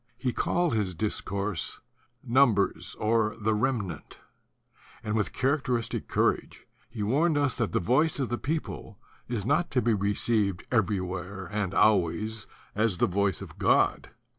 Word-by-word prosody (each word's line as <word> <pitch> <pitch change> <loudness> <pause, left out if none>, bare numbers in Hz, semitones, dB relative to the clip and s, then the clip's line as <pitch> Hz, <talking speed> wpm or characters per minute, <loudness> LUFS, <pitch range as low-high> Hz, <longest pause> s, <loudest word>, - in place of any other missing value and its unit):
He 125 -3 -1
called 175 -5 +1
his 100 -5 -1
discourse, 100 -1 -2 0.4
"Numbers, 110 -9 +2
or 110 0 +1
the 110 +1 +1
Rem 120 +2 +1
nant"; 95 -4 -8 0.9
and 105 -1 -2
with 105 -2 0
characteristic 130 -3 -1
courage - - 0 0.2
he 105 - -4
warned 145 +9 +2
us 145 -2 +2
that 115 -4 -1
the - - +1
voice 140 - +2
of 130 - -1
the 120 - -2
people 145 - -4 0.3
is 115 -5 -3
not 155 +7 +1
to 125 - +1
be 115 0 +3
re 100 0 0
ceived 100 -6 0
everywhere 95 -3 -1
and 105 -3 -2
always 105 +2 +2 0.3
as 105 -3 +1
the 120 - +3
voice 100 -3 0
of - - -12
God. - - +2
110 Hz, 150 wpm, -28 LUFS, 100-125 Hz, 0.9 s, be